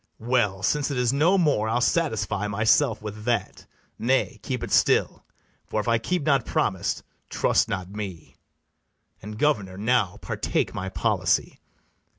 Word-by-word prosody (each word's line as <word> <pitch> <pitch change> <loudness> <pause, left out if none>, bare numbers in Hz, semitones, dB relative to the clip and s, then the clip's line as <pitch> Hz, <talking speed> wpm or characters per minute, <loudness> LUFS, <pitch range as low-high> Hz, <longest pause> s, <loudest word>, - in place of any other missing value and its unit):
well, 110 -5 0
since 145 +6 +1
it 140 - -3
is 125 0 +1
no 165 +8 +3
more, 145 - +2
I'll 120 +2 +1
satisfy 110 - 0
myself 110 +3 +2
with 105 0 -7
that; 115 -6 -2 0.3
nay, 130 +3 +1
keep 125 -4 -4
it - - -5
still, - - +2 0.4
For, 110 - -2
if 105 - -3
I 115 -1 +3
keep 180 +7 -1
not 140 -4 +2
promise, - - -1 0.3
trust - - +1
not 95 -1 -4
me: 100 -6 -7 0.9
And, 105 +1 -8
governor, 105 -10 0
now 110 -3 +1
partake - - -2
my 95 +1 -4
policy. - - 0
115 Hz, 150 wpm, -25 LUFS, 105-135 Hz, 0.9 s, no